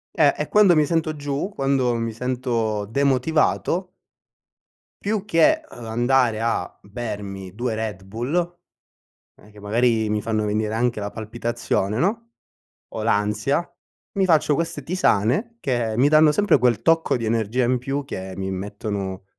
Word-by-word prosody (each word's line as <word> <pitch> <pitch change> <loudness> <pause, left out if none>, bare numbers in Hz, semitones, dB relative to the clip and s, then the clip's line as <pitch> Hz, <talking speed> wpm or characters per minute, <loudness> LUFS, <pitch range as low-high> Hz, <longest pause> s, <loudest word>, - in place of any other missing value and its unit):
Eh, - - +5
e - - -2
quando 205 -4 +5
mi 155 -1 +4
sento 160 -1 0
giù, 145 +5 -3
quando 135 -3 +1
mi 115 0 -2
sento 115 -4 -1
demotivato 140 - +1 1.1
più 210 0 -1
che, 215 - +4
uhm, 120 - -10
andare 120 0 +2
a 115 0 -2
bermi 100 -3 -6
2 120 +1 -2
Red 110 -4 -4
Bull, 150 - -2 0.8
eh, 105 - -19
che 105 - -17
magari 110 +1 +1
mi 105 0 -1
fanno 110 -1 -1
venire 105 +1 -1
anche 120 -1 0
la 100 0 -4
palpitazione, 110 -1 -2
no, 230 - -1 0.6
o 110 - -5
l'ansia, 110 +9 +1 0.5
mi 195 - +3
faccio 160 -4 +3
queste 165 +3 -2
tisane, 185 - +1
che 120 - -1
mi 135 +4 +5
danno 155 0 +6
sempre 205 -2 +3
quel 120 -2 +2
tocco 165 -5 +3
di 115 - -4
energia 115 +2 0
in 125 +1 +1
più, 135 +3 -3
che 95 -7 -6
mi 95 0 -3
mettono 100 0 -4
120 Hz, 150 wpm, -23 LUFS, 110-150 Hz, 1.1 s, danno